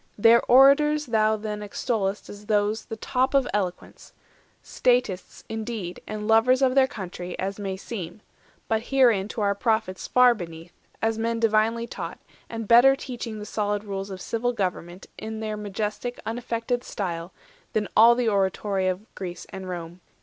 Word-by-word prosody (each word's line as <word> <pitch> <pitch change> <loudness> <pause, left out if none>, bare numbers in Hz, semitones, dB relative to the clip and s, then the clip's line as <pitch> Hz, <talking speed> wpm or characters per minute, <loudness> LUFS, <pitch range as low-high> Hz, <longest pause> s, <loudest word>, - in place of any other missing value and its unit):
Their 230 +3 +6
orators 295 +4 +5
thou 220 -2 +2
then 210 0 -5
extoll'st 205 -1 -2
as 205 0 -11
those 210 +1 +1
The 225 - -6
top 255 +4 0
of 270 -2 +3
eloquence—statists 205 +2 -3
indeed, 220 -5 -5
And 210 0 -5
lovers 245 +4 +4
of 255 -1 +3
their 265 -1 +5
country, 180 -5 -7
as 195 +2 -3
may 195 -2 -3
seem; 195 -1 -7 0.5
But 220 0 +1
herein 240 -8 +4
to 220 - -5
our 200 -1 +2
Prophets 220 -3 -1
far 250 -1 +6
beneath, 170 -4 -9 0.3
As 225 0 +1
men 230 0 -1
divinely 225 +1 +2
taught, - - -6 0.3
and 225 -2 -5
better 245 +4 +7
teaching 240 -5 -6
The 210 - -7
solid 205 -1 -2
rules 195 -1 -5
of 190 -1 -7
civil 245 +2 -1
government, 180 -3 -4
In 220 0 -6
their 215 -1 -3
majestic, 210 +3 -4
unaffected 235 +1 -2
style, 175 -5 -4 0.4
Than 210 -1 0
all 230 +2 +7
the 245 -1 0
oratory 195 -1 0
of 185 +3 -2
Greece 175 -2 -7
and 190 -1 -7
Rome. 175 0 -7
215 Hz, 155 wpm, -25 LUFS, 195-235 Hz, 0.5 s, better